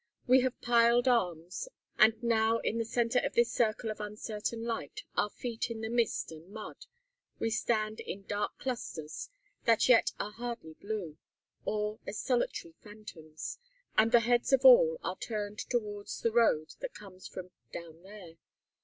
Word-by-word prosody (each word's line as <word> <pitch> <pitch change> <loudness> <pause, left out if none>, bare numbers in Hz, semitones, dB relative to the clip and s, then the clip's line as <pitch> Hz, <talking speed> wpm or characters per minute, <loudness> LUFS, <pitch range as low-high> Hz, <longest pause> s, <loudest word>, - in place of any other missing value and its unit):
We 255 0 +6
have 255 -1 -1
piled 235 +1 +4
arms, 180 - 0 0.3
and 225 +1 +5
now, 225 -1 +3
in 230 0 -1
the 230 - 0
center 235 +2 +1
of - - -3
this 235 0 +4
circle 220 -1 0
of 215 - -7
uncertain 210 +2 -4
light, 235 - -4
our 210 - +2
feet 235 +1 -4
in 225 -1 -5
the 220 0 -3
mist 235 -7 0
and 160 +3 -12
mud, 215 +1 -9 0.5
we 225 - -1
stand 215 -1 0
in 195 - -6
dark 205 +1 -2
clusters 165 - -5 0.4
(that 230 -2 +4
yet 250 -2 +5
are 210 - -3
hardly 230 -8 -6
blue), 190 -5 -5 0.5
or 210 0 -1
as 210 - -4
solitary 240 -9 -1
phantoms; 205 - -9 0.4
and 225 +1 +4
the 240 -1 +7
heads 240 +2 +2
of 270 - +4
all - - +8
are - - -3
turned 210 -2 -4
towards 210 -4 -3
the 230 - +2
road 220 -10 +3
that - - -6
comes 190 -3 -11
from 180 -1 -8 0.2
"down 165 -1 -9
there." 190 -4 -12
220 Hz, 160 wpm, -31 LUFS, 205-235 Hz, 0.5 s, all